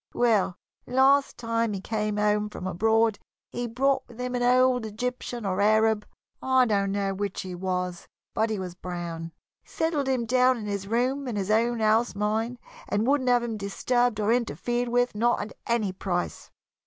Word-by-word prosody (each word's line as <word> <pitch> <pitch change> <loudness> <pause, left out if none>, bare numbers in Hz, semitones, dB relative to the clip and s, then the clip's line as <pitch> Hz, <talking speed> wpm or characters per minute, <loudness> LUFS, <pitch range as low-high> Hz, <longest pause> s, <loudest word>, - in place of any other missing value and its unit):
Well, 215 -6 +2 0.3
last 270 +2 +3
time 230 -2 -1
he 195 - -3
came 210 +1 -2
home 210 0 +1
from 185 - -8
abroad, 220 +4 +2 0.3
he 245 0 -3
brought 270 +4 +1
with 235 0 -15
him 250 0 -3
an 245 - -1
old 250 0 +4
Egyptian 240 +1 -4
or 190 0 0
Arab, 215 0 +3 0.3
I 260 -1 +4
don't 200 -3 +1
know 195 -1 -1
which 200 0 -3
he 185 -1 -6
was, 180 -1 -3 0.3
but 220 +1 +1
he 215 - -1
was 185 -2 -5
brown, 170 -2 -6 0.3
settled 320 -4 -1
him 255 -3 0
down 255 +2 +3
in 220 - -6
this 200 -1 -3
room 255 +5 0
in 240 - -3
his 200 0 -1
own 230 +1 +2
house, 220 +1 +2
mind 220 +4 -1 0.3
and 205 +2 +1
wouldn't 265 -1 +2
have 245 -1 +4
him 230 -2 -3
disturbed 240 +3 0
or 215 +2 +2
interfered 240 0 -1
with, 245 +1 +1
not 235 +3 +2
at 205 - -5
any 230 -4 +1
price. 180 -2 -3
225 Hz, 180 wpm, -26 LUFS, 200-245 Hz, 0.3 s, old